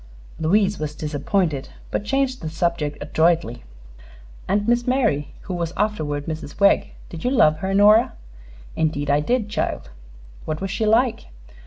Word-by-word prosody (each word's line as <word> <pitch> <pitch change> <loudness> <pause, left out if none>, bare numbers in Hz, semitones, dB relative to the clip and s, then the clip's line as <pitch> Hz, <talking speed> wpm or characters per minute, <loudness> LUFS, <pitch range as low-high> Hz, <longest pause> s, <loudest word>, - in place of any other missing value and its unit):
Louise 195 +4 +2
was 150 -1 -4
disappointed, 150 0 -1 0.2
but - - -1
changed 265 +3 0
the 160 - -4
subject 160 -2 -1
adroitly. 160 -4 +1 0.8
"And 205 +3 0
Miss 240 +1 +2
Mary, 225 - +1
who 190 - -6
was 170 -1 -3
afterward 155 -9 -1
Mrs. 160 -1 -6
Wegg. 200 0 +3 0.2
Did 165 -2 -8
you - - +1
love 155 - +4
her, 190 +3 -2
Nora?" 210 +3 +5 0.6
"Indeed 145 -2 0
I 145 - +3
did, 225 +8 0
child." - - -3 0.5
"What 155 0 -3
was 195 -1 -4
she 215 +3 -1
like?" 230 - +2
175 Hz, 150 wpm, -22 LUFS, 155-210 Hz, 0.8 s, Nora